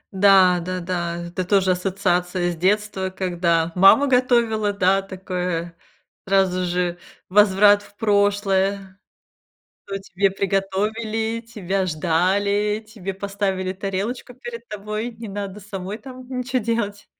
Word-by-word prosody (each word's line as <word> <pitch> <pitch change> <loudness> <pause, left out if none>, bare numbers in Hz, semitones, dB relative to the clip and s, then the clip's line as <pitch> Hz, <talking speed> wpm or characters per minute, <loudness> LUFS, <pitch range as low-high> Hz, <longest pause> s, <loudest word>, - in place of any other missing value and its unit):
Да 190 -2 +6
да 185 +1 -4
да, 170 -1 -2
это 185 +1 -3
тоже 190 0 +2
ассоциация 180 -1 0
с - - -5
детства, 190 +1 0
когда 170 -3 0
мама 195 +10 +6
готовила, 235 -5 +2
да, 195 0 +2
такое 180 -3 -4 0.5
сразу 190 -2 +2
же 175 0 -1 0.3
возврат 205 +1 +5
в 205 - -18
прошлое: 200 -2 +1 0.9
то 195 0 -4
тебе 195 0 0
приготовили, 215 +4 -1
тебя 195 -4 -2
ждали, 195 +6 +1
тебе 195 -3 -6
поставили 195 -1 -2
тарелочку 200 +6 -4
перед 240 -2 -8
тобой, 215 +2 -4
не 225 0 -9
надо 200 0 -6
самой 200 0 -6
там 255 +2 -11
ничего 255 0 -2
делать. 205 -3 -2
195 Hz, 120 wpm, -22 LUFS, 185-210 Hz, 0.9 s, Да